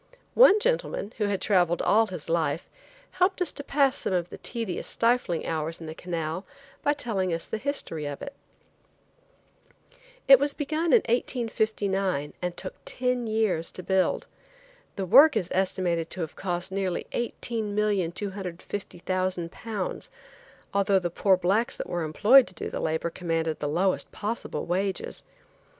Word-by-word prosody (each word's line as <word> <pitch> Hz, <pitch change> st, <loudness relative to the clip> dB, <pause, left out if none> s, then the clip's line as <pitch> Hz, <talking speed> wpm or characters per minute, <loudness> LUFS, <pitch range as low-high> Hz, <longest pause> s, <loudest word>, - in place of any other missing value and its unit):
One 450 Hz, -4 st, +7 dB
gentleman, 470 Hz, -, -1 dB
who 210 Hz, -, +2 dB
had 200 Hz, -2 st, 0 dB
traveled 175 Hz, -4 st, +2 dB
all 220 Hz, +2 st, +4 dB
his 180 Hz, -6 st, -6 dB
life, 165 Hz, -1 st, 0 dB, 0.4 s
helped 370 Hz, +1 st, +1 dB
us 360 Hz, -, +2 dB
to 285 Hz, -, -7 dB
pass 275 Hz, -1 st, +2 dB
some -, -, -1 dB
of 175 Hz, -1 st, -1 dB
the -, -, -9 dB
tedious, 230 Hz, -7 st, -4 dB
stifling 230 Hz, -8 st, +1 dB
hours 160 Hz, +1 st, -2 dB
in 165 Hz, -, -8 dB
the 155 Hz, -, -6 dB
canal 165 Hz, +1 st, -4 dB, 0.4 s
by 290 Hz, -, +2 dB
telling 205 Hz, -10 st, -2 dB
us 165 Hz, 0 st, -2 dB
the 220 Hz, -, -4 dB
history 210 Hz, -, -3 dB
of 145 Hz, -1 st, -5 dB
it. 280 Hz, -, -7 dB, 1.9 s
It 270 Hz, -2 st, +9 dB
was 285 Hz, 0 st, +1 dB
begun 310 Hz, +2 st, -2 dB
in 425 Hz, +6 st, +5 dB
1859 215 Hz, -, 0 dB
and 180 Hz, -1 st, -3 dB
took 185 Hz, -, -6 dB
ten 250 Hz, -2 st, -1 dB
years 215 Hz, -7 st, 0 dB
to 185 Hz, -, -7 dB
build. 190 Hz, 0 st, +1 dB, 0.7 s
The 195 Hz, -, -2 dB
work 290 Hz, -, +7 dB
is 180 Hz, -, -2 dB
estimated 180 Hz, -3 st, 0 dB
to 185 Hz, -, -5 dB
have 160 Hz, -, -5 dB
cost 180 Hz, 0 st, -2 dB
nearly 190 Hz, -2 st, -2 dB
£18,250,000, 195 Hz, -, -3 dB, 0.6 s
although 200 Hz, 0 st, +3 dB
the 175 Hz, -2 st, -1 dB
poor 190 Hz, +2 st, +3 dB
blacks 195 Hz, +6 st, +1 dB
that -, -, -5 dB
were 175 Hz, -, -2 dB
employed 215 Hz, -, +6 dB
to -, -, -12 dB
do -, -, -5 dB
the -, -, -3 dB
labor 160 Hz, +1 st, -1 dB
commanded 165 Hz, -2 st, -2 dB
the 145 Hz, -, -2 dB
lowest 185 Hz, +5 st, 0 dB
possible 220 Hz, +3 st, -4 dB
wages. 190 Hz, +2 st, -2 dB
190 Hz, 150 wpm, -27 LUFS, 175-230 Hz, 1.9 s, It